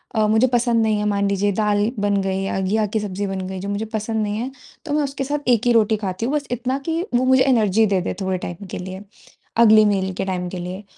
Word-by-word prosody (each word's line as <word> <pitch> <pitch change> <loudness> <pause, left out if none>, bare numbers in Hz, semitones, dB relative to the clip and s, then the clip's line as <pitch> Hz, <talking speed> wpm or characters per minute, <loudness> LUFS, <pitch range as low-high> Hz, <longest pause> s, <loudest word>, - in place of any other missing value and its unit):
अ, 215 -1 +3
मुझे 220 +4 +4
पसंद 235 -1 +2
नहीं 215 -1 +1
है 210 - -1
मान 200 -1 +1
लीजिए 200 +1 +1
दाल 210 +1 +1
बन 200 -1 +1
गई 190 0 -1
या 195 - -2
घिया 210 +3 +1
की 220 - +3
सब्जी 200 -1 -3
बन 190 0 -3
गई 190 0 -5
जो 200 - -5
मुझे 205 +2 -2
पसंद 220 0 -1
नहीं 210 0 -2
है 250 +4 -3 0.3
तो 290 - -3
मैं 300 -1 +2
उसके 275 -1 -3
साथ 285 -1 -2
1 240 0 +3
ही 240 - +5
रोटी 220 -1 +3
खाती 195 +1 -3
हूँ, 270 - -1
बस 290 -2 -2
इतना 250 +2 -1
कि 325 +1 0
वो 255 - +2
मुझे 260 0 +5
एनर्जी 220 -5 +3
दे 195 -2 +1
दे - - -3
थोड़े 190 -1 -1
टाइम 175 +3 -7
के - - -4
लिए, 185 +1 -7 0.6
अगली 215 -2 +7
मील 190 -2 0
के 190 - -3
टाइम 180 -2 -3
के 185 - -6
लिए। 185 +3 -6
210 Hz, 260 wpm, -21 LUFS, 195-235 Hz, 0.6 s, अगली